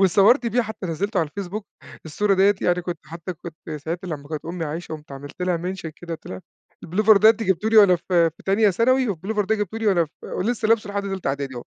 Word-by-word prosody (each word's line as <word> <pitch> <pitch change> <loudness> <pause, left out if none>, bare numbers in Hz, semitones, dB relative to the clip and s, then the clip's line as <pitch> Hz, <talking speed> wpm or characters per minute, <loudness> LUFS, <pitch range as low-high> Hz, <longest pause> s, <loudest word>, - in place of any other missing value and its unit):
واتصوّرت 200 +7 +5
بيه 245 +2 +1
حتى 220 -3 -6
نزّلته 195 +5 -2
على 160 - -1
الفيسبوك، 200 +4 -6 0.4
الصورة 200 +6 +1
دِيّة 195 +2 +4
يعني 180 0 +1
كنت 175 -2 -4
حتى 170 +2 -7
كنت 160 -1 -11
ساعتها 170 +5 -5
لمّا 145 -3 -6
كانت 155 -2 -5
أمي 170 0 -4
عايشة 160 +2 -5
قُمت 150 -2 -9
عملت 145 +6 -8
لها 180 -1 +1
mention 180 -1 -5
كده 170 -1 -6
قُلت 160 - -14
لها: 95 0 -7 0.4
"البلوفر 210 +5 +4
ده 215 +2 +7
أنتِ 225 0 -1
جبتيه 190 +1 +1
ليَّ 225 - +2
وأنا 200 -4 +7
في 170 -1 +2
في 165 - -20
تانية 200 +2 +4
ثانوي 255 +6 +2
والبلوفر 205 +3 -2
ده 220 - +1
جبتيه 210 +1 -3
لي 225 - -2
وأنا 180 -5 +4
ف 150 - -17
ولسه 220 +3 -2
لابسُه 215 -2 +2
لحد 200 0 -2
تالتة 195 -6 -3
إعدادي 135 -1 -3
أهو." 120 - -6
185 Hz, 235 wpm, -23 LUFS, 165-210 Hz, 0.4 s, ده